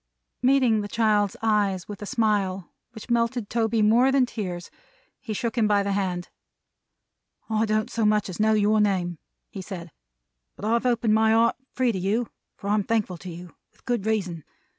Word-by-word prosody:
Meeting 250 Hz, -4 st, +3 dB
the 205 Hz, -, -4 dB
child's 210 Hz, -1 st, +1 dB
eyes 205 Hz, -5 st, +1 dB
with 205 Hz, -1 st, -8 dB
a 205 Hz, -, -5 dB
smile 200 Hz, -6 st, 0 dB, 0.2 s
which 225 Hz, +1 st, -9 dB
melted 235 Hz, -1 st, 0 dB
Toby 225 Hz, -1 st, +1 dB
more 240 Hz, +5 st, +4 dB
than 265 Hz, -1 st, +4 dB
tears, 180 Hz, -7 st, -6 dB, 0.5 s
he 225 Hz, -, -7 dB
shook 225 Hz, +2 st, -2 dB
him 225 Hz, -3 st, +2 dB
by 205 Hz, -1 st, +3 dB
the 200 Hz, -, -1 dB
hand. 185 Hz, -3 st, -2 dB, 1.2 s
"I 220 Hz, +1 st, +1 dB
don't 215 Hz, 0 st, 0 dB
so 225 Hz, -, -1 dB
much 210 Hz, -1 st, +2 dB
as 185 Hz, 0 st, -7 dB
know 220 Hz, +1 st, +3 dB
your 215 Hz, 0 st, +3 dB
name," 180 Hz, -5 st, 0 dB, 0.3 s
he 195 Hz, -, -6 dB
said, 180 Hz, -3 st, -8 dB, 0.6 s
"but -, -, -7 dB
I've 235 Hz, +3 st, +1 dB
opened 235 Hz, -3 st, +2 dB
my 220 Hz, 0 st, +4 dB
heart 230 Hz, +1 st, +3 dB, 0.2 s
free 255 Hz, -2 st, +2 dB
to 190 Hz, -, -3 dB
you, 210 Hz, +5 st, 0 dB, 0.3 s
for 200 Hz, -, -4 dB
I'm 210 Hz, 0 st, +3 dB
thankful 210 Hz, -4 st, -1 dB
to 185 Hz, -, -8 dB
you; 175 Hz, 0 st, -10 dB, 0.2 s
with -, -, -31 dB
good 240 Hz, -4 st, -1 dB
reason. 185 Hz, -7 st, -1 dB
215 Hz, 185 wpm, -25 LUFS, 195-230 Hz, 1.2 s, more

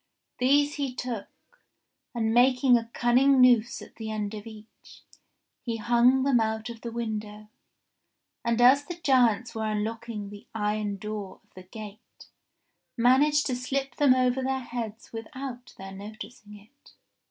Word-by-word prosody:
These 285 Hz, +3 st, +3 dB
he 275 Hz, -3 st, -3 dB
took, 240 Hz, -5 st, -4 dB, 0.9 s
and 225 Hz, -1 st, 0 dB
making 250 Hz, +1 st, +5 dB
a 230 Hz, -1 st, 0 dB
cunning 255 Hz, +4 st, +3 dB
noose 240 Hz, -2 st, +4 dB
at -, -, -16 dB
the 220 Hz, -1 st, -6 dB
end 210 Hz, -1 st, -3 dB
of 210 Hz, 0 st, -8 dB
each, 220 Hz, -1 st, -15 dB, 0.6 s
he 230 Hz, -2 st, -3 dB
hung 240 Hz, +3 st, +3 dB
them 270 Hz, -3 st, +3 dB
out 220 Hz, +1 st, -2 dB
of 230 Hz, -1 st, -12 dB
the 235 Hz, -, -6 dB
window, 215 Hz, -2 st, -5 dB, 0.9 s
and 235 Hz, 0 st, 0 dB
as 260 Hz, +4 st, +6 dB
the 350 Hz, -, -6 dB
giants 250 Hz, -7 st, +2 dB
were 220 Hz, -1 st, -3 dB
unlocking 215 Hz, -1 st, -4 dB
the 205 Hz, 0 st, -12 dB
iron 210 Hz, -1 st, -1 dB
door 210 Hz, -1 st, -6 dB
of -, -, -37 dB
the 185 Hz, -, -11 dB
gate 215 Hz, +1 st, -12 dB, 0.7 s
managed 280 Hz, +5 st, +4 dB
to 255 Hz, -, -1 dB
slip 270 Hz, +2 st, -3 dB
them 280 Hz, -3 st, +5 dB
over 255 Hz, 0 st, +1 dB
their 265 Hz, 0 st, -1 dB
heads 230 Hz, -3 st, -7 dB
without 245 Hz, +2 st, -8 dB
their 195 Hz, 0 st, -9 dB
noticing 210 Hz, +1 st, -10 dB
it. 225 Hz, +8 st, -22 dB
235 Hz, 150 wpm, -27 LUFS, 215-255 Hz, 0.9 s, as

